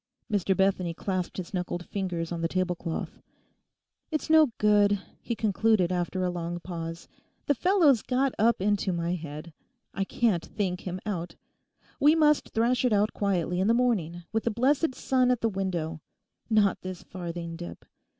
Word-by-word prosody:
Mr 195 -2 +1
Bethany 190 -3 +1
clasped 185 -1 -3
his 185 0 -6
knuckled 180 -1 -3
fingers 180 -4 -3
on 170 -1 -3
the 165 - +1
tablecloth. 180 -2 -3 0.9
'It's 315 -1 -2
no 315 -1 +7
good,' 205 -1 +4 0.2
he 235 - -3
concluded 215 -3 +2
after 180 +1 -1
a 180 - +1
long 175 0 -4
pause; 165 -1 -6 0.4
'the 285 - +3
fellow's 315 - +4
got 265 +1 0
up 230 +2 +3
into 200 0 +1
my 170 0 -1
head. 155 -1 -7 0.4
I 195 - -1
can't 195 -3 +1
think 185 -3 -3
him 180 +1 -3
out. 175 -5 -4 0.6
We 300 +2 +6
must 300 -2 +3
thrash 240 +3 +1
it 250 -3 +3
out 210 +1 +2
quietly 180 -3 0
in 190 - +2
the 230 - +4
morning 185 -9 0
with 225 0 -1
the - - +3
blessed 260 +5 +1
sun 255 -1 +2
at 250 -2 +1
the 230 - +2
window; 175 -5 -3 0.5
not 210 -3 +3
this 185 -1 -7
farthing 170 -2 -6
dip. 175 +1 -9
190 Hz, 165 wpm, -28 LUFS, 175-230 Hz, 0.9 s, no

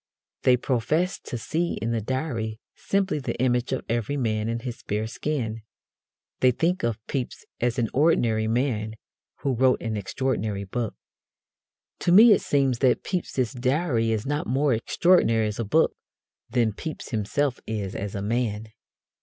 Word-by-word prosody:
They 125 -1 +5
profess 150 +9 0
to 120 - -6
see 165 +9 -1
in 115 - -2
the 115 -1 0
Diary 115 -3 -3
simply 195 -5 0
the 135 - -3
image 125 0 +1
of 130 - -2
Everyman 115 -2 -1
in 115 0 -2
his 120 -1 -6
bare 105 +2 -2
skin. 115 -2 -3 0.8
They 130 - +5
think 165 +9 +1
of 115 -2 0
Pepys 130 -4 -4
as 120 +1 0
an 120 -2 +1
ordinary 120 -7 +3
man 110 -2 0 0.5
who 135 - 0
wrote 130 +1 +3
an 110 -2 -3
extraordinary 105 -1 -2
book. 110 +3 -3 1.0
To 175 - +1
me 220 +6 +9
it 205 - +5
seems 135 -4 +1
that 130 -3 +3
Pepys's 135 - -2
Diary 130 -2 +1
is 110 -1 -1
not 145 +2 -1
more 135 +2 +2
extraordinary 115 -2 +3
as 105 +1 -3
a - - +1
book 100 - +3 0.6
than 115 -3 +1
Pepys 155 +7 -6
himself 125 +4 -1
is 105 -4 -3
as 100 +1 -4
a 100 - -3
man. 110 -1 -1
120 Hz, 155 wpm, -25 LUFS, 110-140 Hz, 1.0 s, me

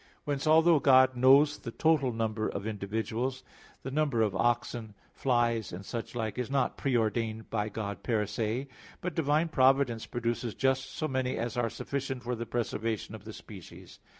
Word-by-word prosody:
Whence, 145 0 -2
although 160 +1 +6
God 130 -1 +5
knows 140 +4 +5
the 115 - -6
total 145 0 +2
number 110 -1 -1
of 100 0 -4
individuals, 110 +5 -3 0.4
the 135 - -5
number 140 -6 +1
of 105 -3 -1
oxen, 120 -1 -1 0.2
flies 120 -4 +1
and 95 +3 -7
such 115 +2 -5
like, 110 0 -3
is 125 - -2
not 135 0 +1
pre 135 -3 0
ordained 110 0 -1
by 105 -1 -1
God 100 -3 -5
per 110 -3 0
se; 110 +6 -2 0.3
but 180 -1 -4
divine 155 +1 +1
providence 130 -4 +3
produces 120 -1 -2
just 130 0 +1
so 155 - -3
many 130 -2 -1
as 120 +2 -3
are 120 -2 0
sufficient 135 0 -4
for 125 +1 -2
the 115 -1 -4
preservation 115 -2 -2
of 110 -1 -10
the 110 - -7
species. 100 -5 -12
120 Hz, 175 wpm, -30 LUFS, 110-135 Hz, 0.4 s, although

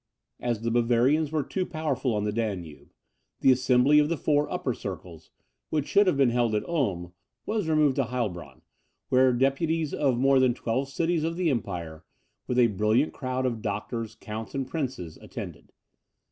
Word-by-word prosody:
As 120 -2 -2
the 115 - 0
Bavarians 120 +6 +2
were 155 -2 0
too 185 +7 -2
powerful 150 -8 -2
on 105 - -1
the 105 - 0
Danube, 100 -8 -4 0.5
the 135 - +6
assembly 130 +3 +4
of 150 0 +2
the 170 - 0
four 145 -1 +1
Upper 130 - -1
Circles, 85 -6 -8 0.4
which 150 -3 0
should 200 0 +4
have 180 - +2
been 135 -3 +4
held 120 -2 +1
at 105 - -2
Ulm, 95 - -1 0.3
was 210 -6 -1
removed 150 -3 +3
to 135 - +2
Heilbronn, 90 - -4 0.5
where 130 0 +5
deputies 140 +5 0
of 135 -4 +1
more 135 +1 +4
than 130 -2 +3
twelve 130 +4 -2
cities 165 +2 0
of 165 +1 -1
the 175 -3 +1
empire, 85 - -4 0.4
with 125 - -1
a 125 - +6
brilliant 110 +6 +1
crowd 130 -1 -2
of 120 -3 -2
doctors, 110 +2 -4
counts, 110 +1 -7
and 135 -2 -2
princes, 130 - -4
attended. - - -9
125 Hz, 175 wpm, -27 LUFS, 110-145 Hz, 0.5 s, the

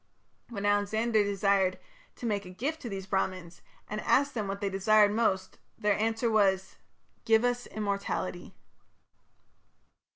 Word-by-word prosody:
'" - - -43
When 205 -4 -5
Alexander 210 +2 +2
desired 195 -2 +1 0.4
to - - -8
make 205 -3 -1
a 180 - -10
gift 275 - -4
to 240 - -5
these 195 -2 -5
Brahmans, 185 -3 -3 0.3
and 210 +1 -4
asked 280 +1 +2
them 215 -4 -3
what 195 0 -4
they 200 - -1
desired 205 +2 +4
most, 190 -4 0 0.2
their 210 0 +2
answer 225 +2 0
was, 190 -3 +2 0.5
"Give 225 +1 +4
us 245 0 -1
immortality". 200 -3 -3
205 Hz, 140 wpm, -29 LUFS, 195-225 Hz, 0.5 s, desired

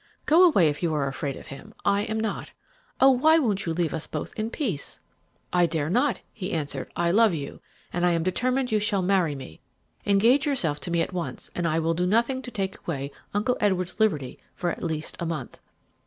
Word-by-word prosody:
Go 330 +4 +6
away 200 - +5
if 150 -1 -2
you 165 -3 0
are 140 -2 0
afraid 135 0 -3
of - - -11
him; 135 - -10
I 200 0 +3
am 220 0 -2
not. 220 -2 -3 0.5
Oh, 270 +1 +7
why 310 +6 +5
don't 215 -10 +1
you - - +1
leave 165 -1 0
us 160 -1 -3
both - - -5
in 220 +1 -2
peace?' 215 - -4 0.5
"'I 175 -1 +4
dare 155 -2 -1
not,' 255 +8 +2
he 200 -2 -5
answered. 145 -4 -2
'I 170 0 +1
love 215 -2 +4
you, 140 -3 -6 0.3
and 175 - -1
I 175 -1 +4
am 165 -1 0
determined 250 +7 0
you 215 - +3
shall 205 -2 +1
marry 180 -5 +2
me. 105 - -10 0.5
Engage 230 +8 +4
yourself 165 - 0
to 175 - -3
me 170 0 +2
at - - -6
once, 175 -2 -5
and 175 -1 -1
I 160 0 +1
will 165 0 +1
do 180 +2 0
nothing 235 +6 +2
to 255 - -7
take 195 -4 -3
away 140 -4 -4 0.2
Uncle 245 +5 +1
Edward's 185 -2 0
liberty 150 -12 0 0.2
for 175 -2 -1
at - - -7
least 160 -2 -3
a 170 - -2
month.' 155 -7 -5
180 Hz, 215 wpm, -26 LUFS, 160-220 Hz, 0.5 s, Oh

